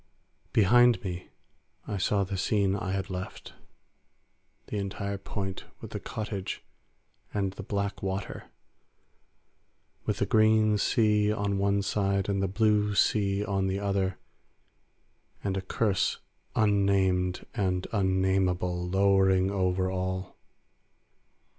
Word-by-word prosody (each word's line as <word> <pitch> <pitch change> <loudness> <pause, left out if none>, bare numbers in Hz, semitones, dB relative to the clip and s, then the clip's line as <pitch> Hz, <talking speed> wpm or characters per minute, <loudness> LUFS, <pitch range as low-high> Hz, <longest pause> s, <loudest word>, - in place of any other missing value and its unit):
Behind 120 +3 +5
me 90 -2 -5 0.6
I 105 - -2
saw 100 +2 +1
the 95 +1 -4
scene 100 +1 +1
I 95 -1 -3
had 95 0 -3
left; 90 0 -6 1.1
the - - -4
entire 100 0 -4
point 95 -1 -5
with - - -9
the - - -4
cottage 105 -3 -5 0.7
and 100 -2 0
the 100 - -7
black 100 0 -3
water, 95 0 -4 1.6
with - - 0
the - - +1
green 110 -1 +4
sea 105 -2 +3
on 100 -2 -1
one 100 0 +2
side 100 -1 0
and 100 -1 0
the 95 - +1
blue 105 +1 +2
sea 100 0 +2
on 95 -1 0
the 95 +1 -1
other, 100 -2 -1 1.3
and 100 -1 -1
a 95 - -1
curse 100 0 0 0.4
unnamed 95 -3 +2
and 90 -2 0
unnamable 95 -2 +1
lowering 95 0 +3
over 95 -1 0
all. 95 0 -3
100 Hz, 115 wpm, -28 LUFS, 95-100 Hz, 1.6 s, Behind